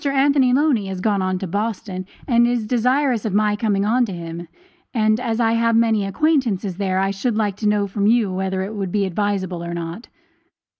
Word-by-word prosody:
Anthony 275 -2 +3
Loney 260 -6 +2
has 190 -1 -5
gone 200 0 +1
on 185 0 -1
to 190 - -4
Boston, 195 -1 -3 0.2
and 235 -3 +4
is 240 -2 0
desirous 250 +1 +1
of 210 -3 -2
my 210 0 +2
coming 205 -2 0
on 240 +4 +2
to - - -5
him; 170 -1 -7 0.5
and 215 -1 +2
as 230 -2 -2
I 225 -1 +3
have 230 0 +2
many 225 -3 +2
acquaintances 215 - 0
there, 190 -2 -1
I 195 +1 +1
should 210 +3 -2
like 205 -3 0
to 210 - -1
know 205 -1 +1
from 200 +1 -1
you 220 -4 +2
whether 190 0 -2
it 200 +3 -5
would 195 -4 -4
be 205 0 +1
advisable 190 -2 -2
or 170 0 -5
not. 170 +6 -6
210 Hz, 205 wpm, -21 LUFS, 190-230 Hz, 0.5 s, and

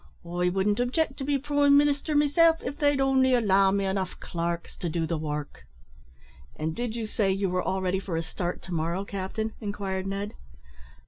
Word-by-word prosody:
I 175 +1 0
wouldn't 195 +4 +1
object 265 +3 0
to 275 - -4
be 285 +1 +1
prime 285 0 +4
minister 290 +1 +2
meself 320 +3 +4
av 280 +3 -5
they'd 290 -2 +3
only 265 -1 +4
allow 195 -4 +4
me 200 0 +1
enough 190 -1 -2
clarks 170 0 -4
to 175 - -3
do 165 0 -1
the 165 - -1
work." 150 - -5 0.9
"And 160 +1 -3
did 240 -2 -3
you 230 -2 -3
say 210 -2 0
you 195 -1 0
were 180 0 +1
all 190 +1 -1
ready 185 +1 +1
for 185 -4 -3
a 165 - -1
start 175 +2 -4
to 180 - -6
morrow, 170 +4 -1
captain?" 200 +3 -4
inquired 195 -2 -3
Ned. 200 +2 -3
195 Hz, 190 wpm, -27 LUFS, 180-265 Hz, 0.9 s, prime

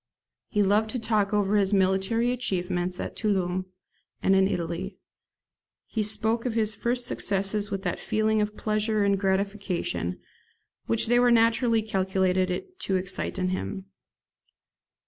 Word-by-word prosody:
He 210 - +1
loved 210 +3 +2
to 250 - -2
talk 215 -3 +1
over 205 -1 +1
his 200 0 +2
military 195 +5 +2
achievements 180 -6 -1
at - - -5
Toulon 185 -4 0 0.6
and 195 - +4
in 190 0 +4
Italy. 180 +1 -4 0.9
He 220 - -2
spoke 220 +2 +1
of 245 -3 -2
his 220 -2 +2
first 245 +3 -1
successes 205 -1 0
with 195 -2 -4
that 175 - -2
feeling 215 0 +1
of 210 0 -3
pleasure 215 0 0
and 200 -1 +2
gratification 190 - -1 0.7
which 115 - +1
they 240 +2 +3
were 245 0 +5
naturally 230 0 +3
calculated 190 - 0
to 195 - -1
excite 185 +1 -2
in 185 -1 0
him. 190 +1 -4
200 Hz, 140 wpm, -26 LUFS, 190-220 Hz, 0.9 s, were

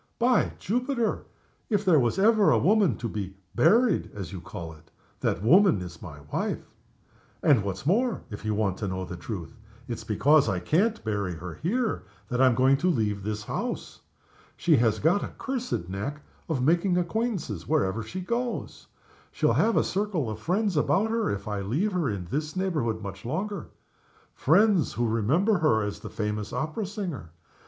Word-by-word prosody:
By 245 -1 +2
Jupiter! 245 +2 -1 0.4
if 205 -3 +2
ever 190 -3 +2
there 155 - +6
was 120 +3 +1
a 205 +4 +6 0.3
woman 205 -2 +3
to 120 - -3
be 100 -3 -5 0.2
'buried' 220 - +3
(as 95 -3 -6
you 90 - -6
call 85 -2 -7
it), 80 0 -19 0.3
that 90 - -1
woman 180 - +5
is 90 -2 -8
my 75 -1 -9
wife. - - -2 0.8
And, 140 -8 +5
what's 100 +4 -4
more, 230 - +1
if 105 - -7
you 110 -1 -1
want 100 -3 0
the 95 -3 -4
truth, 90 +1 -6 0.3
it's 120 - -5
because 140 +5 +3
I 95 -3 0
can't 205 - +1
bury 100 -5 -2
her 90 +1 -7
here 225 - -1 0.3
that 125 -1 0
I'm 130 -3 +5
going 130 +2 +4
to 180 +6 +1
leave 105 - 0
this 105 +1 -3
house. - - -4 0.6
She 170 -3 +4
has 115 -2 +2
got 165 - +2
a - - -7
cursed 250 - -3
knack 110 +11 -5 0.3
of 135 -6 0
making 175 +5 +3
acquaintances 175 - -2
wherever 95 +3 +1
she 175 +13 -6
goes. 235 +5 -3 0.4
She'll - - +2
have 230 0 +3
a - - +4
circle 190 - -1
of 110 - -6
friends 185 - 0
about 205 +8 +2
her 225 -1 0
if 100 0 -4
I 105 -1 -2
leave 145 - 0
her 175 -7 0
in 95 -4 -4
this 150 - -3
neighborhood 150 - -1
much 100 -1 -7
longer. 195 - -3 0.7
Friends 190 +3 +3
who 120 0 0
remember 155 - +2
her 110 -9 +3
as 105 0 -4
the - - -8
famous 105 -1 -3
opera 155 - -2
singer. 185 - -5
135 Hz, 175 wpm, -27 LUFS, -, 0.8 s, there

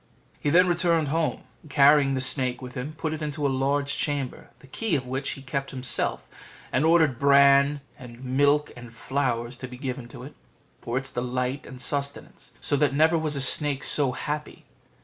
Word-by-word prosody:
He 145 - -1
then 180 +4 +5
returned 170 -3 +1
home, 160 +2 -1 0.2
and 155 - -17
carrying 140 -1 +4
the 130 - -1
snake 130 -1 +1
with 125 -1 -9
him, 135 +5 -5
put 155 0 -4
it 155 - -6
into 150 -1 -3
a - - +3
large 140 +1 0
chamber, 145 -4 -3
the 125 - -19
key 180 +7 -2
of 130 -3 -2
which 130 +2 -3
he 135 - -11
kept 135 +1 -4
himself, 130 -1 -1 0.4
and 130 - +1
ordered 160 -7 +3
bran, 140 +1 +5 0.2
milk, 130 +4 0
and 120 -1 -12
flowers 125 -1 -2
to 130 - -6
be 125 0 -11
given 130 -2 -5
to 120 - -11
it, - - -10 0.5
for 120 +2 -3
its 135 0 -4
delight 125 +3 -3
and 130 - -10
sustenance; 140 +2 -4
so - - 0
that 145 -1 +1
never 160 +3 +4
was 150 -4 +1
snake 145 -2 +1
so 140 -4 +3
happy. 150 +3 -5
140 Hz, 185 wpm, -25 LUFS, 130-150 Hz, 0.5 s, then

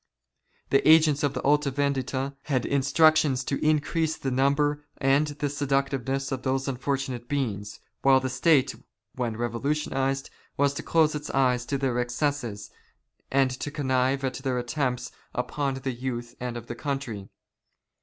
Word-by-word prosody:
The 135 - +5
agents 155 -2 +6
of 145 -3 0
the - - -3
Alta 145 0 +3
Vendita 135 -1 -1
had 130 -4 0
instructions 140 0 +3
to 140 - -2
increase 155 +1 +1
the 135 - -3
number 145 +3 +2
and 140 +2 +3
the 145 0 -3
seductiveness 135 -1 -1
of 130 -1 -2
those 135 +1 -1
unfortunate 135 -2 -3
beings, 105 -8 -2 0.2
while 135 -1 +6
the 130 - -2
State, 130 0 +3 0.4
when 120 -3 -3
revolutionized, 135 +3 -1 0.3
was 140 0 +3
to - - -4
close 160 -2 +3
its 150 0 -5
eyes 125 -2 +1
to 140 - 0
their 130 -3 0
excesses, 120 -4 -2 0.6
and 135 -1 +3
to 130 +3 -4
connive 135 -2 0
at 130 - -1
their 130 -2 -2
attempts 125 0 -2 0.2
upon 135 +2 -1
the 130 0 -3
youth 120 -1 -4
of 120 -2 -4
the 120 - -5
country. 120 -7 -4
135 Hz, 145 wpm, -26 LUFS, 125-145 Hz, 0.6 s, agents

